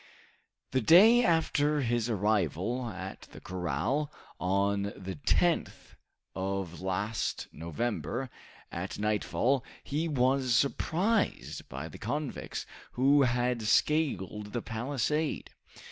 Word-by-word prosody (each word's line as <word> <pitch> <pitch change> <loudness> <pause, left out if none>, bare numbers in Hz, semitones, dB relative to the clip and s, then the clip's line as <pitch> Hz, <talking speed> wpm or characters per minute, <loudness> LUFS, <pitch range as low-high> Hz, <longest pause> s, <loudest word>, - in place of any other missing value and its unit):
The 130 - +2
day 215 - +7
after 150 -5 +2
his 120 -2 0
arrival 105 - 0
at 95 -1 -7
the - - -9
corral, 90 - -2 0.3
on 100 +2 +1
the 95 -4 -7
10th - - +1 0.4
of 95 -2 -3
last 100 +4 -2
November, 120 - -3 0.4
at 90 +3 -4
nightfall, 110 +5 +1 0.2
he 155 +4 -1
was 130 -3 +2
surprised 185 - 0
by 70 +5 -5
the 80 - -11
convicts, 140 +5 -4 0.3
who 140 +3 +4
had 125 -1 +1
scaled 105 - +1
the 120 - -2
palisade. 140 +6 -2
120 Hz, 100 wpm, -30 LUFS, 95-140 Hz, 0.4 s, day